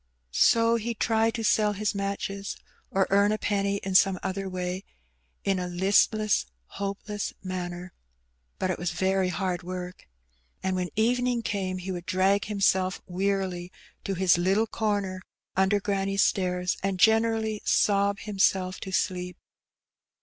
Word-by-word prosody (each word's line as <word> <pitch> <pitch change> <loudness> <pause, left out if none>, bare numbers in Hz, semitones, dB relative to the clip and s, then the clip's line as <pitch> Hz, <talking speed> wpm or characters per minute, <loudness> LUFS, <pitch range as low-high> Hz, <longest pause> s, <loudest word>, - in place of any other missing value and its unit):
So 230 - +4
he 230 +1 -3
tried 225 +1 +1
to 230 - -3
sell 210 -1 +3
his 210 +1 -1
matches 200 0 -3 0.3
or 195 0 +2
earn 200 +1 +4
a 215 - +1
penny 200 -1 0
in 190 - -3
some 190 0 +5
other 195 0 -3
way 180 +1 -3 0.6
in 195 -1 +1
a 180 - -3
listless, 200 - +2 0.2
hopeless 200 +1 -4
manner. 180 -1 -5 0.6
But 185 - 0
it - - -4
was 175 0 -1
very 190 +2 +1
hard 180 -1 -2
work. 180 0 -7 0.6
And 190 0 0
when 180 -1 -2
evening 245 +2 +1
came 190 -4 -2
he 185 +1 -5
would 175 -1 -6
drag 195 +1 +2
him 210 -2 -4
self 185 -1 +2
wearily 185 -1 -2 0.3
to 195 - -2
his 180 -1 +3
little 195 +5 +2
corner 205 -4 -2 0.3
under 190 +2 +3
granny's 195 -1 +1
stairs, 180 -1 0
and 195 -1 -1
generally 220 0 +3
sob 200 0 +2
himself 190 -2 +1
to 190 - -6
sleep. 180 -1 -1
195 Hz, 145 wpm, -27 LUFS, 185-205 Hz, 0.6 s, some